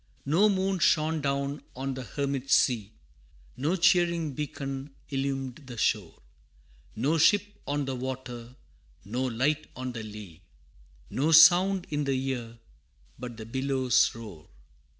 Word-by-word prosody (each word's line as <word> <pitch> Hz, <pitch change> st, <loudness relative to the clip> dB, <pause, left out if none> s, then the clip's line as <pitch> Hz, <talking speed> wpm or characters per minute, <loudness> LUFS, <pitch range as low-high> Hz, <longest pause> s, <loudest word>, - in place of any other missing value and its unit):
No 175 Hz, +10 st, +4 dB
moon 190 Hz, -1 st, 0 dB
shone 155 Hz, -1 st, +2 dB
down 140 Hz, +1 st, -2 dB
on 135 Hz, +1 st, -3 dB
the 130 Hz, -, -6 dB
hermit 140 Hz, 0 st, -3 dB
sea, 110 Hz, -7 st, +3 dB, 0.6 s
No 150 Hz, +8 st, 0 dB
cheering 170 Hz, -3 st, +2 dB
beacon 140 Hz, -1 st, -5 dB
illumed 135 Hz, -2 st, -2 dB
the 120 Hz, -2 st, -8 dB
shore, 105 Hz, -7 st, -1 dB, 0.7 s
No 145 Hz, +8 st, +1 dB
ship 205 Hz, +6 st, +5 dB, 0.2 s
on 145 Hz, 0 st, -1 dB
the 135 Hz, -1 st, -3 dB
water, 125 Hz, -2 st, -6 dB, 0.5 s
no 120 Hz, +6 st, -2 dB
light 135 Hz, +5 st, 0 dB
on 130 Hz, 0 st, -4 dB
the 115 Hz, -2 st, -6 dB
lea, 105 Hz, -6 st, -10 dB, 0.7 s
No 150 Hz, +5 st, +1 dB
sound 175 Hz, +4 st, +7 dB
in 145 Hz, -1 st, -1 dB
the 135 Hz, -, +1 dB, 0.2 s
ear 120 Hz, -3 st, -5 dB, 0.6 s
but 120 Hz, -2 st, -7 dB
the 110 Hz, -, -8 dB
billow's 130 Hz, +1 st, +1 dB
roar! 105 Hz, -9 st, -11 dB
135 Hz, 130 wpm, -28 LUFS, 125-155 Hz, 0.7 s, sound